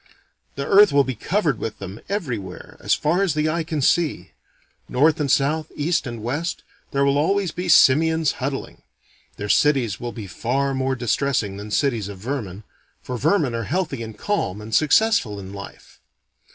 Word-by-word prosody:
The 140 Hz, -, -3 dB
earth 205 Hz, -1 st, +6 dB
will 140 Hz, 0 st, +4 dB
be 130 Hz, 0 st, -3 dB
covered 155 Hz, -, -1 dB
with 110 Hz, -, -4 dB
them 95 Hz, +2 st, -8 dB
everywhere, 120 Hz, -, -5 dB
as -, -, +2 dB
far 170 Hz, +6 st, +1 dB
as 175 Hz, -6 st, 0 dB
eye 155 Hz, +2 st, +1 dB
can 155 Hz, -3 st, -3 dB
see. 165 Hz, +3 st, +1 dB, 0.6 s
North 150 Hz, +5 st, +3 dB
and 145 Hz, -2 st, 0 dB
south, 155 Hz, +3 st, +1 dB
east 165 Hz, 0 st, 0 dB
and 120 Hz, -3 st, -6 dB
west, 145 Hz, +9 st, -3 dB, 0.3 s
there 140 Hz, 0 st, +1 dB
will 140 Hz, +1 st, +2 dB
always 195 Hz, +3 st, +1 dB
be 180 Hz, +2 st, -4 dB
simians 160 Hz, +1 st, +5 dB
huddling. 135 Hz, +1 st, -4 dB, 0.6 s
Their 105 Hz, -, -4 dB
cities 125 Hz, -5 st, +2 dB
will 120 Hz, 0 st, -4 dB
be 110 Hz, -4 st, -8 dB
far 135 Hz, +8 st, -1 dB
more 130 Hz, 0 st, 0 dB
distressing 120 Hz, -3 st, -1 dB
than 105 Hz, +1 st, -8 dB
cities 115 Hz, -3 st, 0 dB
of 100 Hz, -1 st, -8 dB
vermin, 105 Hz, -3 st, -5 dB, 0.4 s
for 125 Hz, -, -5 dB
vermin 150 Hz, -, +1 dB
are 115 Hz, -1 st, -3 dB
healthy 155 Hz, -, -2 dB
and 110 Hz, -1 st, -7 dB
calm 105 Hz, -, -2 dB
and 110 Hz, +1 st, -9 dB
successful 155 Hz, -, +3 dB
in 95 Hz, 0 st, -9 dB
life. 100 Hz, 0 st, -11 dB
140 Hz, 170 wpm, -22 LUFS, 110-160 Hz, 0.6 s, earth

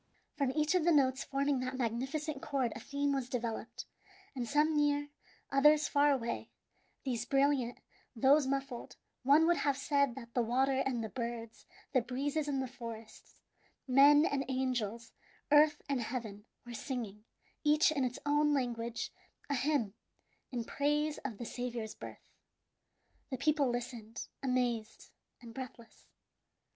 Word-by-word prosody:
From 280 Hz, -4 st, +1 dB
each 305 Hz, +2 st, +2 dB
of 365 Hz, -3 st, +3 dB
the 345 Hz, -, +4 dB
notes 265 Hz, -3 st, +3 dB
forming 275 Hz, 0 st, 0 dB
that 255 Hz, +1 st, -3 dB
magnificent 270 Hz, +5 st, -2 dB
chord 270 Hz, -6 st, -1 dB
a -, -, -6 dB
theme 285 Hz, 0 st, -1 dB
was 265 Hz, -3 st, -2 dB
developed; 235 Hz, -3 st, -4 dB, 0.5 s
and 245 Hz, -3 st, -3 dB
some 300 Hz, +2 st, +3 dB
near, 290 Hz, 0 st, +2 dB, 0.4 s
others 295 Hz, +2 st, +5 dB
far 290 Hz, 0 st, +4 dB
away, 235 Hz, -4 st, -2 dB, 0.6 s
these 240 Hz, -4 st, -1 dB
brilliant, 275 Hz, -2 st, +2 dB, 0.4 s
those 270 Hz, +4 st, +5 dB
muffled, 275 Hz, -2 st, -3 dB, 0.3 s
one 285 Hz, +5 st, +5 dB
would 345 Hz, 0 st, +3 dB
have 280 Hz, -1 st, +1 dB
said 280 Hz, -3 st, +1 dB
that 235 Hz, -3 st, -10 dB
the 245 Hz, -, +2 dB
waters 265 Hz, +3 st, +1 dB
and 240 Hz, -4 st, -1 dB
the 220 Hz, -, -4 dB
birds, 230 Hz, -1 st, -6 dB, 0.3 s
the 255 Hz, -, +4 dB
breezes 280 Hz, +5 st, -2 dB
and 270 Hz, -2 st, 0 dB
the -, -, -4 dB
forests, 230 Hz, -3 st, -10 dB, 0.5 s
men 285 Hz, +4 st, +7 dB
and 275 Hz, -4 st, 0 dB
angels, 240 Hz, -4 st, -2 dB, 0.4 s
earth 295 Hz, 0 st, +5 dB
and 275 Hz, -3 st, 0 dB
heaven, 220 Hz, -3 st, -5 dB, 0.2 s
were 240 Hz, -, -8 dB
singing, 225 Hz, -5 st, -5 dB, 0.4 s
each 300 Hz, +1 st, +4 dB
in 285 Hz, -4 st, 0 dB
its 250 Hz, -1 st, -2 dB
own 295 Hz, 0 st, +3 dB
language, 235 Hz, -3 st, -2 dB, 0.4 s
a -, -, +3 dB
hymn 265 Hz, -6 st, +1 dB, 0.6 s
in 240 Hz, -2 st, -2 dB
praise 295 Hz, +4 st, 0 dB
of 240 Hz, -7 st, -5 dB
the 240 Hz, -, -6 dB
Saviour's 240 Hz, -2 st, -4 dB
birth. -, -, -11 dB, 1.0 s
The 260 Hz, -, -3 dB
people 290 Hz, 0 st, +2 dB
listened, 240 Hz, -2 st, -5 dB
amazed 245 Hz, -4 st, -1 dB, 0.3 s
and 230 Hz, -1 st, -10 dB
breathless. 250 Hz, -3 st, -10 dB
265 Hz, 145 wpm, -33 LUFS, 235-285 Hz, 1.0 s, men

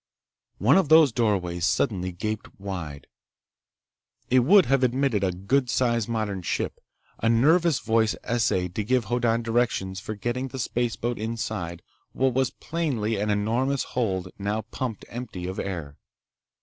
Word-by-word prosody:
One 120 Hz, -, +4 dB
of 185 Hz, -7 st, +2 dB
those 155 Hz, -3 st, +7 dB
doorways 95 Hz, -7 st, 0 dB
suddenly 90 Hz, +1 st, 0 dB
gaped 110 Hz, +4 st, -5 dB
wide. 90 Hz, -8 st, -6 dB, 1.3 s
It 130 Hz, -, +6 dB
would 180 Hz, +10 st, +6 dB
have 135 Hz, -1 st, +2 dB
admitted 125 Hz, -4 st, +1 dB
a 95 Hz, -, +2 dB
good 120 Hz, +9 st, 0 dB
sized 120 Hz, -2 st, +1 dB
modern 110 Hz, -4 st, -2 dB
ship. 85 Hz, -, -2 dB, 0.4 s
A 115 Hz, -, +1 dB
nervous 155 Hz, +7 st, +4 dB
voice 110 Hz, -1 st, +1 dB
essayed 95 Hz, -7 st, 0 dB
to 110 Hz, +2 st, -2 dB
give 125 Hz, +1 st, +1 dB
Hoddan 115 Hz, +1 st, +1 dB
directions 115 Hz, -5 st, 0 dB
for 110 Hz, +2 st, -6 dB
getting 120 Hz, +5 st, -2 dB
the 130 Hz, -, -8 dB
spaceboat 120 Hz, -1 st, -2 dB
inside 110 Hz, -6 st, -4 dB, 0.3 s
what 130 Hz, -1 st, +1 dB
was 130 Hz, 0 st, +2 dB
plainly 130 Hz, -10 st, -2 dB
an 105 Hz, +1 st, -1 dB
enormous 115 Hz, +7 st, +1 dB
hold 95 Hz, -7 st, -1 dB
now 105 Hz, +2 st, -1 dB
pumped 115 Hz, 0 st, -5 dB
empty 115 Hz, -7 st, -6 dB
of 95 Hz, +1 st, -4 dB
air. 80 Hz, -7 st, -5 dB
115 Hz, 145 wpm, -25 LUFS, 100-125 Hz, 1.3 s, those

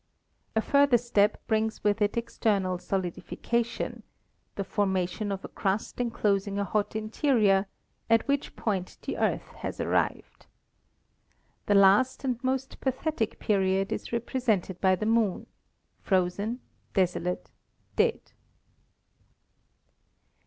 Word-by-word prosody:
A 220 Hz, -, +3 dB
further 280 Hz, -3 st, +5 dB
step 215 Hz, -3 st, +2 dB
brings 220 Hz, 0 st, 0 dB
with 210 Hz, +1 st, +1 dB
it 205 Hz, +2 st, +1 dB
external 200 Hz, -6 st, 0 dB
solidification, 200 Hz, +6 st, -2 dB, 0.5 s
the 200 Hz, -, -2 dB
formation 190 Hz, +1 st, -1 dB
of 195 Hz, -1 st, -4 dB
a -, -, -5 dB
crust 195 Hz, +4 st, -2 dB
enclosing 200 Hz, -4 st, 0 dB
a 200 Hz, -, +1 dB
hot 205 Hz, +2 st, -1 dB
interior, 215 Hz, -3 st, +2 dB, 0.4 s
at 230 Hz, +2 st, +4 dB
which 280 Hz, 0 st, -1 dB
point 190 Hz, -5 st, -2 dB
the -, -, -3 dB
Earth -, -, 0 dB
has -, -, -5 dB
arrived. -, -, -1 dB, 1.2 s
The 205 Hz, -, +4 dB
last 200 Hz, +8 st, +5 dB
and 250 Hz, -2 st, -2 dB
most 265 Hz, +1 st, -2 dB
pathetic 265 Hz, -3 st, -1 dB
period 195 Hz, 0 st, +1 dB
is -, -, -4 dB
represented 230 Hz, -6 st, -1 dB
by 190 Hz, -1 st, +4 dB
the 200 Hz, -, -3 dB
Moon 225 Hz, -4 st, +1 dB, 0.3 s
— -, -, -46 dB
frozen, 200 Hz, +6 st, 0 dB, 0.3 s
desolate, 180 Hz, -2 st, 0 dB, 0.4 s
dead. -, -, +1 dB
210 Hz, 115 wpm, -28 LUFS, 195-235 Hz, 1.2 s, further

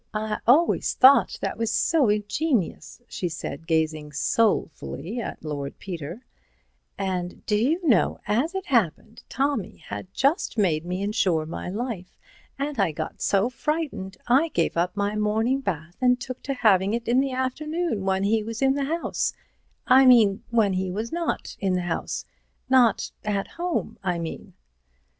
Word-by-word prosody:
"I 215 Hz, 0 st, -2 dB
always 300 Hz, +8 st, +4 dB
thought 265 Hz, +2 st, +6 dB
that -, -, -3 dB
was 230 Hz, -1 st, 0 dB
so 280 Hz, +2 st, +3 dB
ingenious," 210 Hz, -, -1 dB
she 180 Hz, -, -3 dB
said, 165 Hz, 0 st, -6 dB
gazing 155 Hz, -2 st, 0 dB
soulfully 200 Hz, -, 0 dB
at 185 Hz, -, -7 dB
Lord 140 Hz, -2 st, -4 dB
Peter, 175 Hz, -, -7 dB, 0.7 s
"and 185 Hz, -2 st, -3 dB
do 210 Hz, -, +1 dB
you 315 Hz, -, +1 dB
know, 225 Hz, -10 st, +3 dB
as 250 Hz, -, 0 dB
it 385 Hz, -, -3 dB
happened, 225 Hz, -, 0 dB
Tommy 270 Hz, -, -1 dB
had 100 Hz, +2 st, -8 dB
just 280 Hz, -, 0 dB
made 170 Hz, -6 st, +1 dB
me 180 Hz, +2 st, -2 dB
insure 185 Hz, -6 st, +1 dB
my 165 Hz, +2 st, -5 dB
life, 205 Hz, -3 st, -5 dB, 0.4 s
and 280 Hz, -2 st, -3 dB
I 195 Hz, -5 st, +3 dB
got 155 Hz, +1 st, -6 dB
so 200 Hz, +2 st, +2 dB
frightened, 255 Hz, -, -3 dB
I 265 Hz, +7 st, +4 dB
gave 170 Hz, -, 0 dB
up 175 Hz, +4 st, 0 dB
my 205 Hz, +1 st, 0 dB
morning 220 Hz, +5 st, +1 dB
bath 170 Hz, -, -4 dB
and 250 Hz, -1 st, +4 dB
took 250 Hz, 0 st, -6 dB
to 275 Hz, -, 0 dB
having 205 Hz, -3 st, +3 dB
it 235 Hz, -, -5 dB
in 245 Hz, +2 st, +3 dB
the 270 Hz, -1 st, 0 dB
afternoon 300 Hz, -, -2 dB
when 190 Hz, 0 st, +1 dB
he 215 Hz, +2 st, +2 dB
was 230 Hz, +4 st, -4 dB
in 270 Hz, 0 st, +4 dB
the 280 Hz, 0 st, -1 dB
House—I 270 Hz, -4 st, 0 dB
mean, 220 Hz, -6 st, +6 dB
when 220 Hz, -5 st, +2 dB
he 185 Hz, 0 st, -1 dB
was 215 Hz, +5 st, -4 dB
not 340 Hz, 0 st, -3 dB
in 195 Hz, -2 st, 0 dB
the 180 Hz, -, 0 dB
house—not 240 Hz, +7 st, 0 dB
at 205 Hz, -2 st, -1 dB
home, 350 Hz, 0 st, -3 dB
I 180 Hz, -2 st, 0 dB
mean." 165 Hz, -1 st, -7 dB
215 Hz, 155 wpm, -25 LUFS, 180-260 Hz, 0.7 s, thought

